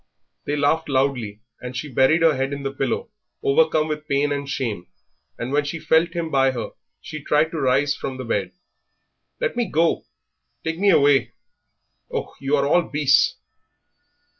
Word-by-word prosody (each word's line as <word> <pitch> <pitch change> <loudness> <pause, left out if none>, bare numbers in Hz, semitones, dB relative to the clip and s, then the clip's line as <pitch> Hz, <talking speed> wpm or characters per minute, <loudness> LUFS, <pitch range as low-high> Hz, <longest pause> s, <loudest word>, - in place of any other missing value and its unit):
They 145 - 0
laughed 150 +2 +1
loudly, 130 -6 0 0.2
and 125 0 -6
she 150 - -4
buried 145 +5 +3
her 165 -2 +5
head 135 +2 -1
in 140 0 -5
the 135 0 -3
pillow, 455 - -2 0.3
overcome 415 - +3
with 150 0 -4
pain 145 0 +1
and 140 -1 -3
shame; 115 -10 -3 0.5
and 120 +2 -4
when 145 +1 +2
she 145 +3 -4
felt 165 +1 +2
him 165 -2 -2
by 135 -1 +4
her 120 - -5 0.3
she 155 -2 -8
tried 150 +2 +2
to 160 - -3
rise 135 +2 +2
from 130 -1 -5
the 130 - -6
bed. 100 -4 -2 0.9
"Let - - -1
me 240 - +1
go! 165 +2 +1 0.6
take 165 +1 -3
me 200 +1 +4
away! 145 -5 +4 0.8
Oh, - - -4
you 140 +1 +1
are 140 - +1
all 175 +5 +4
beasts!" 145 -2 +3
145 Hz, 170 wpm, -22 LUFS, 135-160 Hz, 0.9 s, her